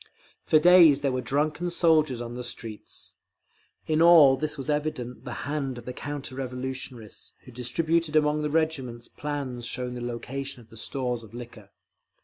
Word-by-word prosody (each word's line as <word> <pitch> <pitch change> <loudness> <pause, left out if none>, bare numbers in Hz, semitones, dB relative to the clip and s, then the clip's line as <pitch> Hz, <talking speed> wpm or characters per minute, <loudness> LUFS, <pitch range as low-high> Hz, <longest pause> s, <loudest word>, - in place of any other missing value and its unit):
For 155 - +5
days 165 -3 +7
there 140 -2 +1
were 130 0 -1
drunken 150 +6 -1
soldiers 155 -7 +2
on 120 0 -6
the 125 0 -5
streets…. 115 -3 -7 0.7
In 155 0 +1
all 165 -6 +8
this 150 +3 -3
was 135 - -5
evident 150 -5 -3
the - - -5
hand 140 -3 -2
of 120 - -10
the 125 - -5
counter 145 0 -6
revolutionists, 130 -3 -6
who 125 - -12
distributed 155 +7 0
among 150 0 +3
the 150 - -1
regiments 145 -7 -1
plans 135 -5 -4
showing 125 -1 -3
the 125 - -6
location 130 +3 -5
of 115 -2 -18
the - - -13
stores 125 0 -3
of 115 0 -13
liquor. 115 -4 -10
135 Hz, 165 wpm, -26 LUFS, 125-150 Hz, 0.7 s, all